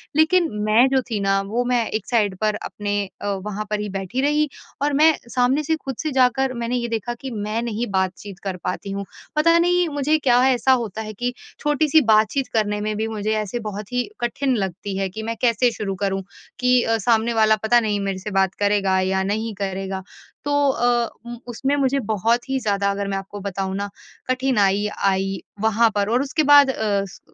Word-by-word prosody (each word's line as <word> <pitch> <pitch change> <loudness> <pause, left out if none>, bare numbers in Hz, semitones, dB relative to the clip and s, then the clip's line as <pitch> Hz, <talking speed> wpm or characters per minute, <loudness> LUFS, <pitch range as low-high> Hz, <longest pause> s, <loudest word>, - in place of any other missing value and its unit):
लेकिन 330 +3 +4 0.2
मैं 225 +5 +5
जो 265 -1 +2
थी 215 - -1
ना 195 0 +2
वो 235 +4 0
मैं 240 -2 +2
एक 215 -2 -3
साइड 205 -6 +1
पर 215 -1 +1
अपने 205 -1 -4 0.3
अ, - - -3
वहाँ 205 +2 -3
पर 210 -1 -1
ही 210 0 -3
बैठी 195 +6 -3
रही। 295 +1 +2 0.3
और 290 0 +1
मैं 315 +3 +5 0.2
सामने 255 +4 +2
से 320 +2 +1
ख़ुद 270 -4 -6
से 310 - -1
जाकर 260 0 +2
मैंने 235 +1 -1
ये 235 -1 -2
देखा 230 +1 -2
कि 265 -1 -5
मैं 215 +1 -2
नहीं 235 0 -2
बातचीत 190 +1 -3
कर 190 -2 -3
पाती 195 +2 -3
हूँ। 200 0 -4 0.3
पता 335 +2 +5
नहीं 355 0 +3
मुझे 305 +3 +3
क्या 250 -3 +4
ऐसा 260 +1 +2
होता 215 +1 -6
है 215 0 -6
कि 245 +4 -3 0.3
छोटी-सी 295 +1 +3
बातचीत 220 +5 +1
करने 210 -1 0
में 215 0 -2
भी 220 +1 -1
मुझे 215 -1 -2
ऐसे 225 +4 -4
बहुत 205 +1 -7
ही 245 +9 -1
कठिन 270 +4 -3
लगती 195 0 -3
है 195 0 0
कि 220 +4 -7
मैं 230 +1 -3
कैसे 240 0 +3
शुरू 195 -3 -4
करूँ? 195 -1 -1 0.4
कि 250 -1 +4
अ, 225 0 +1
सामने 230 +2 +2
वाला 220 -1 +4
पता 240 +2 +5
नहीं 210 -3 -1
मेरे 195 -1 -2
से 205 +2 -6
बात 190 -1 +2
करेगा 200 -2 +2
या 190 0 0
नहीं 215 +3 -2
करेगा। 195 -1 -3 0.4
तो 290 - -1 0.2
अ, 240 -2 +1 0.4
उसमें 265 +4 -1
मुझे 275 -1 +1
बहुत 230 +4 0
ही 265 0 0
ज़्यादा 200 -3 0
अगर 200 0 -3
मैं 195 0 -2
आपको 195 +1 -7
बताऊँ 195 -1 -3
न 200 0 -2 0.4
कठिनाई 210 -6 +2 0.2
आई 195 0 +1 0.2
वहाँ 220 +1 +3
पर 205 0 +1
और 245 +3 +2
उसके 300 +3 0
बाद 285 -1 +8
अ, 210 -5 0
उस 195 - -11
220 Hz, 205 wpm, -22 LUFS, 200-255 Hz, 0.4 s, बाद